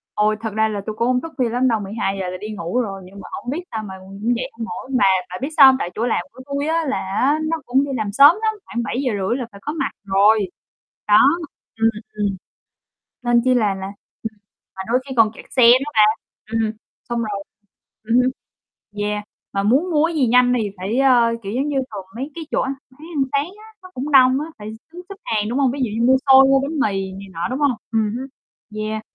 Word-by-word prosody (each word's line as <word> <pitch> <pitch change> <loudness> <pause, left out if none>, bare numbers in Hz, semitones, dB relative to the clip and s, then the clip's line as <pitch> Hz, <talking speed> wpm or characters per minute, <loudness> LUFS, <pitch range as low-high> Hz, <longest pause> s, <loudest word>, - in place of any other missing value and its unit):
Ôi, 210 0 +2
thật 225 - -3
ra 220 0 +2
là 205 -2 -3
tui 215 - -3
cũng 235 - 0
hông 250 0 +2
thức 330 -1 -8
khuya 250 -4 +1
lắm 250 +2 +1
đâu, 225 -2 +1
12:00 195 -2 -3
là 185 - -4
đi 215 - -6
ngủ 175 +9 -1
rồi 195 -5 -4
nhưng 195 +2 -12
mà - - -10
hổng 245 - -5
biết 305 +6 -2
sao 220 -1 -3
mà, 190 -2 -8
ừm, 190 0 -14
cũng 240 +2 +1
dậy 255 +3 -4
hông 225 0 -6
nổi, 230 +3 -7
mà - - +4 0.3
bà 180 - -5
biết 275 - -2
sao 275 - +10
hông? 265 0 +7
Tại 175 - -3
chỗ 230 +3 -1
làm 230 - +1
của 260 - -14
tui 280 +1 -2
á 325 +1 +1
là 275 - 0
á 255 +11 +1
nó 330 - +1
cũng 265 +3 +2
đi 280 - -5
làm 210 -2 -2
sớm 285 - +7
lắm, 435 0 +1
khoảng 235 - -3
7:30 235 -3 -1
là 245 - -4
phải 200 - -13
có 295 - -3
mặt 320 - -2
rồi. 200 0 +3 0.6
Đó, 210 - +7 0.6
ừm, 225 - +5 0.3
ừm. 205 -2 -1 0.9
Nên 240 -1 +3
chi 255 - +3
là 215 -5 +2
là 190 0 -6 0.4
ừm, 220 -1 -6 0.4
mà 190 - -5
đôi 245 +2 +2
khi 265 - -5
còn 220 -1 +5
kẹt - - -13
xe 255 - +3
nữa 260 +5 +5
bà. 215 - +5 0.5
Ừm 225 - +1
hừm, 220 -1 0 0.4
xong 235 - -1
rồi 205 -3 -3 0.6
ừm 225 +2 0
hưm, 250 +1 +4 0.7
yeah, 210 0 -2 0.3
mà 195 0 0
muốn 275 - +2
mua 305 -1 +3
cái 335 - -5
gì 265 -5 +2
nhanh 245 +1 +4
thì 210 - -2
phải, 195 +6 -2
ơ, 245 -4 +4
kiểu, 195 - -5
giống 270 +4 0
như 285 -2 -1
thường 200 -3 -7
mấy 270 +5 -5
cái 330 - -5
chỗ - - +1
ăn 270 +1 -1 0.2
bán 260 - -24 0.2
ăn 275 - +3
sáng 285 +6 0
á, 440 - -16
nó 370 - -11
cũng 280 +4 -4
đông 260 -1 +6
á, 305 - -4
phải 210 - -7
x 280 +9 -24
đứng 355 - -8
xếp 395 - -7
hàng, 215 -1 -1
đúng 255 +4 -1
hông? 265 -3 +3
Ví 280 - -5
dụ 240 - 0
như 235 - +3
mua 260 - +6 0.2
xôi, 265 0 +9
mua 270 0 +4
bánh 285 +2 -3
mì 195 -6 0
này 195 +1 -9
nọ, 165 +1 -2
đúng 260 +3 -3
hông? 285 -2 +3 0.2
Ừm 220 -1 0
hứm, 265 +2 -5 0.5
yeah. 215 0 -3
235 Hz, 255 wpm, -20 LUFS, 210-270 Hz, 0.9 s, sao